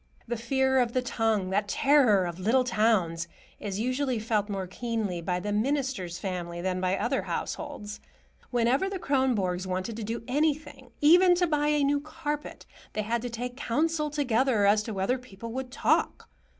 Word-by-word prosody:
The 240 - -1
fear 265 +3 +1
of 240 -2 +1
the 255 - +1
tongue, 220 -6 0
that 205 +1 +1
terror 245 -5 +4
of 175 0 -5
little 230 +7 +3
towns, 210 -8 +1 0.3
is 200 -1 -4
usually 255 +2 0
felt 215 -1 -1
more 195 -2 -2
keenly 210 -2 -3
by 180 +1 -1
the 205 +3 -3
minister's 230 -6 -1
family 175 -3 -4
than 185 +1 -2
by 185 +1 +1
other - - 0
households. 250 -9 -5 0.5
Whenever 245 +9 +2
the 390 - -3
Kronborgs 230 - 0
wanted 185 +4 -3
to 225 - -4
do 225 +2 -4
anything, 295 +2 -1
even 355 +4 +7
to 355 0 +2
buy 295 -3 +1
a 295 -1 +2
new 285 +1 +2
carpet, 300 -1 -5 0.3
they 215 - -1
had 230 +2 -1
to 245 - -4
take 245 +1 -5
counsel 300 +4 0
together 260 -6 +2
as 205 +1 +5
to 220 - -6
whether 200 +6 0
people 230 -2 -9
would 260 0 -4
talk. 275 - +1
230 Hz, 175 wpm, -28 LUFS, 200-275 Hz, 0.5 s, even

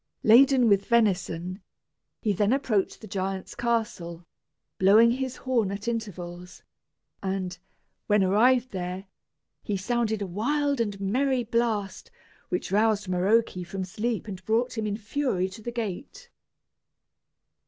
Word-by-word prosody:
Laden 250 +2 +6
with 200 -2 +3
venison, 185 -5 +1 0.6
he 210 -3 +2
then 205 +4 +2
approached 225 -8 0
the 220 - -9
giant's 190 -1 -4
castle, 210 -8 -2 0.5
blowing 215 +5 +6
his 260 +1 -2
horn 240 -6 0
at 200 +3 -6
intervals; 180 -6 -5 0.6
and, 190 -2 -3 0.5
when 210 -2 +4
arrived 245 +6 +3
there, 185 0 -4 0.6
he 205 - -2
sounded 220 +1 -1
a - - -2
wild 275 +8 0
and 205 -3 -2
merry 250 +6 +1
blast, 225 -3 -1 0.4
which 360 - -2
roused 210 0 +2
Maroke 195 +6 +2
from 190 +2 -5
sleep 220 +5 -3
and 190 -3 -7
brought 240 +4 0
him 220 -2 -2
in 205 0 -2
fury 215 -4 -1
to 190 +4 -11
the 240 - -5
gate. 235 - -6
210 Hz, 130 wpm, -26 LUFS, 190-235 Hz, 0.6 s, Laden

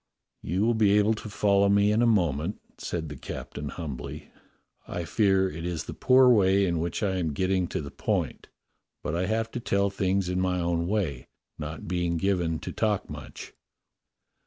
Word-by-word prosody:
"You 90 +5 -1
w411 115 0 +2
be 105 -1 +5
able 105 +1 +4
to 110 0 -7
follow 100 -1 +3
me 100 +1 +4
in 110 +2 +2
a 120 - +4
moment," 85 -4 +1 0.2
said 80 -2 -3
the 75 - -7
captain 70 +2 -6
humbly. 75 -7 -7 0.6
"I 85 -1 -4
fear 95 -1 +3
it 80 -2 -6
is 85 -3 -2
the - - -7
poor 130 0 +5
way 100 -4 +4
in 85 -3 0
which 85 +5 -2
I 95 -2 +1
am 80 -4 -1
getting 95 +3 +1
to - - -3
the 70 -1 -7
point; - - -2 0.6
but 75 - -2
I 90 +2 0
have 110 +1 -1
to - - -4
tell 100 -3 +1
things 95 -1 0
in 90 0 -1
my 90 -1 0
own 85 -1 0
way, 90 - -1 0.3
not 75 +1 -6
being 85 -1 0
given 85 -3 0
to - - -5
talk 105 -3 -1
much." - - -9
95 Hz, 185 wpm, -27 LUFS, 85-100 Hz, 0.6 s, be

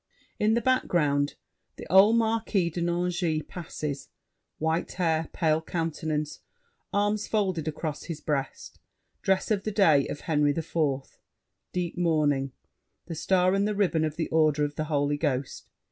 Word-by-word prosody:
[In 215 +1 +3
the 235 - +1
background, 150 - +1 0.4
the - - -9
old 200 +4 +7
Marquis 220 -6 +1
de 175 - -4
Nangis 175 -2 0
passes; 150 -5 -5 0.5
white 160 +2 -1
hair, 165 -3 0
pale 160 -1 +1
countenance, 160 -2 -3 0.5
arms 205 +1 0
folded 185 -7 0
across 155 -1 -4
his 165 -3 -5
breast, 145 -3 -3 0.4
dress 190 +2 +1
of 200 -2 +1
the - - -1
day 165 -10 +4
of 145 - -6
Henry 150 -2 +1
IV.: 165 0 -5 1.0
deep 180 -1 -3
mourning; 150 -5 +2 0.5
the 170 - -6
star 185 +3 +2
and 200 +1 +2
the 210 - -1
ribbon 180 -6 +2
of 155 -1 -1
the 165 - -2
order 155 -2 +3
of 145 - -4
the 155 - -3
Holy 145 -1 0
Ghost. 140 -3 -2
165 Hz, 145 wpm, -27 LUFS, 150-190 Hz, 1.0 s, old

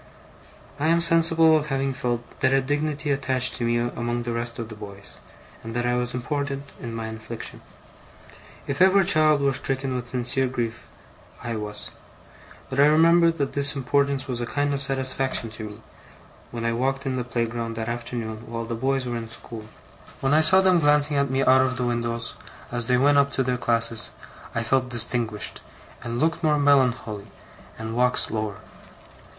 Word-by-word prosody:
I 150 - +1
am 165 +1 +4
sensible 165 -1 +5
of 150 -1 0
having 135 -1 -1
felt 120 -2 -2 0.2
that 130 -1 +2
a 135 - +4
dignity 145 +2 -2
attached 130 -2 +1
to 120 - -2
me 120 0 +1
among 120 0 -2
the 120 - -3
rest 115 0 -3
of 115 -1 -6
the 110 - -8
boys, 100 -1 -7 0.5
and 115 0 -7
that 120 0 -1
I 120 - +1
was 125 0 -2
important 140 +2 -3
in 115 -2 -6
my 115 -1 -4
affliction. 110 +1 -7 1.0
If 140 +4 -3
ever 190 +1 +6
child 155 -5 +3
were 140 -1 +2
stricken 135 0 -2
with 120 -1 -4
sincere 130 +2 0
grief, 120 -3 -4 0.6
I 115 -1 -3
was. 105 -1 -3 0.8
But 135 0 -4
I 145 - +7
remember 165 +2 +5
that 145 -5 -2
this 140 0 +3
importance 140 0 0
was 125 -2 -3
a 120 - -3
kind 145 +2 -1
of 140 - -2
satisfaction 130 -3 0
to 110 0 -7
me, 105 - -12 0.7
when 115 -1 -5
I 115 - +1
walked 135 +3 -1
in 130 -1 -1
the 125 - -2
playground 115 -1 -3
that 110 0 -4
afternoon 115 -2 -5
while 115 0 -4
the 115 - -5
boys 130 +3 -1
were 120 -1 -3
in 115 -1 -7
school. 115 -1 -10 0.5
When 135 +1 +1
I 155 - +5
saw 185 +4 +7
them 185 -2 +4
glancing 150 -1 +3
at 140 -1 +1
me 130 +1 0
out 130 0 +5
of 130 -1 0
the 125 - -1
windows, 115 -1 -2 0.4
as 120 -1 -2
they 125 -1 +3
went 145 +2 +4
up 140 0 +2
to 135 - +1
their 125 0 0
classes, 115 -2 +2 0.5
I 115 - 0
felt 130 +2 +1
distinguished, 115 -2 +1 0.4
and 120 0 -4
looked 160 +2 0
more 150 -1 +3
melancholy, 125 -7 +1 0.5
and 110 0 -5
walked 125 +1 +2
slower. 105 -2 -1
125 Hz, 185 wpm, -24 LUFS, 115-140 Hz, 1.0 s, I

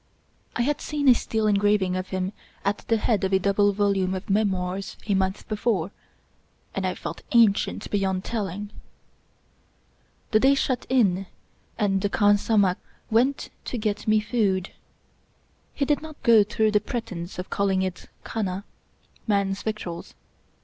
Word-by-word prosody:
I 240 - +1
had 290 +3 0
seen 295 -2 -2
a - - +10
steel 220 -2 -1
en 210 - +4
graving 200 -2 +2
of 185 0 -3
him 185 +1 -2 0.3
at 200 - +1
the 225 - +3
head 215 -2 +1
of 190 0 0
a - - +6
double 200 +2 +3
volume 195 -2 +1
of 190 +3 -5
Memoirs 195 -2 -1
a 210 - +1
month 190 +1 -1
before, 205 -4 0 0.8
and - - -1
I - - -2
felt - - -6
ancient 225 -4 +3
beyond 190 -2 0
telling. 205 -2 -4 1.6
The 215 - +5
day 270 +4 +5
shut 255 -2 -1
in 195 -7 +2 0.5
and 195 -3 +1
the 205 - 0
khansamah 205 -2 +3 0.3
went 255 +5 +2
to 250 - -3
get 210 -2 -2
me 215 0 +4
food. 205 -4 0 1.0
He 280 - 0
did 290 +1 +1
not 310 -1 -10
go 230 -4 +7
through 220 +1 +1
the 210 -1 +3
pretense 190 -7 -5
of 180 - -6
calling 195 -2 +1
it 185 -1 -5
" - - -38
khana 195 -3 -3 0.3
" - - -39
— - - -33
man's 200 -2 +1
victuals. 200 -6 -5
205 Hz, 160 wpm, -25 LUFS, 190-220 Hz, 1.6 s, a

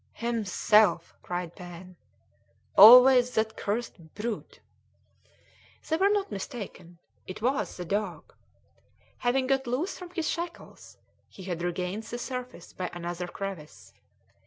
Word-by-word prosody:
"Himself!" 215 -3 +2
cried 175 -1 -5
Pen; 180 +1 -11 0.8
"always 250 +3 +9
that 220 0 0
cursed 200 -7 -5
brute." 220 +1 -5 1.3
They 320 - +1
were 390 +3 +3
not 410 - 0
mistaken 195 - -7 0.3
it 185 - -7
was 265 +3 -1
the 180 - -6
dog. 195 -4 -3 0.9
Having 255 +2 +1
got 270 0 0
loose 270 +11 -2
from 360 -1 -9
his 335 -3 -3
shackles, 340 0 -6 0.3
he 190 - -12
had 175 -2 -4
regained 180 +3 -3
the 225 +2 -7
surface 250 -7 -7
by 180 -1 -4
another 175 +1 -5
crevice. 180 -5 -8
215 Hz, 120 wpm, -28 LUFS, 180-250 Hz, 1.3 s, always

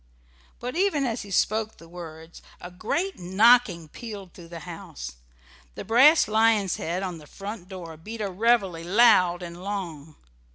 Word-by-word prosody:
But 250 +2 -5
even 350 -6 +1
as 235 -1 -2
he 205 - -10
spoke 215 +3 0
the 165 - -15
words 165 -1 -10 0.2
a 180 - -9
great 335 - -2
knocking 190 -1 +4
pealed 200 0 -9
through 170 -2 -12
the 170 -1 -9
house: 65 - -8 0.6
the - - -7
brass 270 +8 +6
lion's 215 -3 +2
head 175 +4 -3
on 180 -3 -4
the 150 - -15
front 200 0 -8
door 175 -4 -8
beat 220 +8 -8
a 205 -2 -2
reveille 195 -4 +1
loud 180 -3 +4
and 170 0 -8
long. 165 -7 -5
190 Hz, 160 wpm, -25 LUFS, 170-225 Hz, 0.6 s, brass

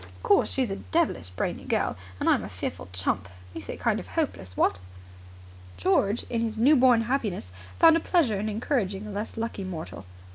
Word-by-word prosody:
Of 90 0 -17
course, 205 - +4
she's 255 -6 +1
a 195 - -3
devilish 315 - 0
brainy 90 - -3
girl, - - 0 0.2
and - - -1
I'm - - +4
a 95 - -6
fearful 90 -2 -5
chump. 90 0 -1 0.2
Makes - - -8
it - - -5
kind - - +1
of - - -9
hopeless, 90 0 -3
what?" 95 - +2 1.0
George, 200 - +2
in 230 -1 -1
his 225 -1 -2
new 270 +7 +6
born 250 -3 +5
happiness, 225 - -2 0.3
found 325 -1 +7
a - - +3
pleasure 295 - +2
in 215 +2 -2
encouraging 210 -3 -1
a 210 - -6
less 205 +3 -5
lucky 225 -3 -3
mortal. 165 - -6
205 Hz, 190 wpm, -27 LUFS, -, 1.0 s, found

